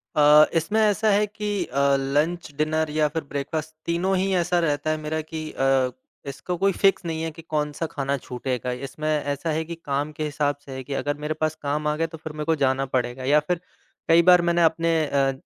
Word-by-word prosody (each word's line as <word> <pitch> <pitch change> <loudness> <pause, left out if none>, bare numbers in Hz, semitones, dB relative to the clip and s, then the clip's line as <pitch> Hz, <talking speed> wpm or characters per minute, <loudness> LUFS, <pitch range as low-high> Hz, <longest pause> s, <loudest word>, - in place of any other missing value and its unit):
अ, 150 0 +7
इसमें 165 +7 +1
ऐसा 215 +1 +3
है 205 +1 +3
कि 205 -2 -3
अ, 140 +1 -3 0.2
लंच, 150 +5 -1
डिनर 155 +1 0
या 150 0 +2
फिर 160 +1 -4
ब्रेकफ़ास्ट, 150 +3 -4
तीनों 180 +3 0
ही 190 +1 0
ऐसा 175 0 +2
रहता 150 -2 0
है 155 - 0
मेरा 155 +1 -3
कि 155 0 -6
अ, 135 -1 +2 0.4
इसको 175 +6 -5
कोई 195 +2 +2
फ़िक्स 195 0 +2
नहीं 160 -1 -3
है 165 - -2
कि 165 - -12
कौन-सा 150 0 -2
खाना 140 0 -1
छूटेगा। 125 -1 -4 0.2
इसमें 155 +3 -6
ऐसा 145 0 -1
है 160 +1 -1
कि 170 +1 -6
काम 145 -2 -3
के 155 - -2
हिसाब 145 -1 0
से 140 - -10
है 130 0 -6
कि 140 - -6
अगर 145 +1 -2
मेरे 155 - -1
पास 155 0 -1
काम 150 +1 -1
आ 150 - +1
गया, 165 +1 0
तो 160 - -10
फिर 155 0 -8
मेरे 150 0 -5
को 165 - +2
जाना 135 -1 +1
पड़ेगा 130 0 -2
या 145 +3 +4
फिर, 165 +3 -2 0.5
कई 165 +1 +7
बार 180 -1 +7
मैंने 170 0 +2
अपने 165 0 +2
अ 140 -2 +1
155 Hz, 220 wpm, -24 LUFS, 145-165 Hz, 0.5 s, अ